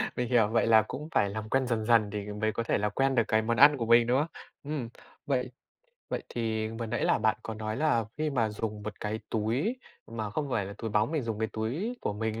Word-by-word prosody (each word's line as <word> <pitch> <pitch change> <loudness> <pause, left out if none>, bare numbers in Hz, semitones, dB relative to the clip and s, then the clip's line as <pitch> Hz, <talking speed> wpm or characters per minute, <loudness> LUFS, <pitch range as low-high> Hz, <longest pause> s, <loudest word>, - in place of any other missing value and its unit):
Mình 125 -1 -2
hiểu, 115 -4 +4
vậy 115 +1 +1
là 110 -1 +7
cũng 150 +3 -6
phải 100 - +2
làm 110 +1 -5
quen 130 +1 +1
dần 115 -3 -1
dần 115 -2 +4
thì 105 0 -4
mới 110 +1 0
có 115 - -2
thể - - +1
là 105 0 0
quen 135 +5 +1
được 115 - +4
cái 110 0 +3
món 115 +1 -1
ăn 145 +1 +8
của 115 - -2
mình, 115 +1 +5
đúng 125 +2 +3
không? 150 - 0 0.4
Ừm, 140 -5 -4 0.4
vậy 130 -3 -1 0.6
vậy - - -3
thì 110 -2 -2
vừa 115 +1 -5
nãy 120 +2 -1
là - - +3
bạn 110 0 +2
có 110 - -5
nói 110 0 -4
là 150 -7 +2
khi 155 0 0
mà 120 -5 +1
dùng 105 0 -4
một 105 0 -7
cái 110 +1 -3
túi 120 - 0 0.3
mà 110 -2 -4
không 145 +6 -2
phải 110 -6 0
là 100 - -7
túi 115 - -4
bóng, 105 +4 +2
mình 155 -4 0
dùng 115 -3 -3
cái 110 0 0
túi 150 - -2
của - - -1
mình 110 +1 -3
115 Hz, 255 wpm, -29 LUFS, 110-125 Hz, 0.6 s, ăn